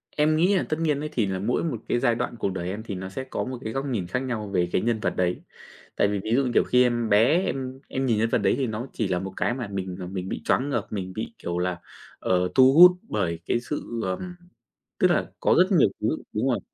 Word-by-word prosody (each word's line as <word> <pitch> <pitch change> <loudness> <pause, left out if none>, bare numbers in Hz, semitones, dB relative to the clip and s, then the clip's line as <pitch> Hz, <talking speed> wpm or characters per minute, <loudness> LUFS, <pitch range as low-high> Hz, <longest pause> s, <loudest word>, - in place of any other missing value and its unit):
Em 155 +1 +3
nghĩ 180 +5 +3
là - - +2
tất 155 - 0
nhiên 150 -3 +1
ấy 150 0 -4
thì 115 -7 +1
nà 95 -1 -2
mỗi 115 - 0
một 145 -9 -2
cái 120 - +2
giai 120 -1 +2
đoạn 120 0 -3
cuộc 100 - 0
đời 90 -1 -4
em 105 +3 -5
thì 100 -4 -5
nó 95 +1 -6
sẽ 130 +7 -5
có 130 - -4
một 130 -1 -5
cái 110 - -4
góc 135 +1 -2
nhìn 110 -10 -2
khác 125 - -1
nhau 120 -5 -3
về 90 -3 0
cái - - +1
nhân 115 -1 0
vật - - -1
đấy. 90 -1 0 0.5
Tại - - +3
vì 100 -1 -1
ví 110 - -4
dụ, 140 - +3
như 125 - -1
kiểu, - - +4
khi 125 0 +4
em 120 -2 0
bé, 125 - +4
em 130 -3 -4
em 135 0 -2
nhìn 115 -4 +2
nhân 115 +1 +1
vật - - +2
đấy 100 -3 +2
thì 135 -3 0
nó 110 +4 -4
chỉ 110 - -1
là 90 -1 0
một 95 0 -6
cái 120 - +1
mà 120 -4 -4
mình, 95 -2 -4
ờ, 90 - -5
mình 95 0 -5
bị - - -4
choáng 140 +3 +1
ngợp, - - -1
mình 95 -3 -5
bị, 110 +1 -5
kiểu 85 0 -4
là, 90 -1 -1 0.4
ờ, 90 -1 +1
thu 130 0 +7
hút 180 +3 +10
bởi 85 -6 -2
cái 120 - +1
sự 120 -3 -5
ờ, 95 0 -2 0.8
tức - - +4
là - - 0
có - - +3
rất - - +4
nhiều - - +5
thứ - - +1 0.3
đúng - - 0
rồi, - - +1
115 Hz, 280 wpm, -25 LUFS, 95-130 Hz, 0.8 s, hút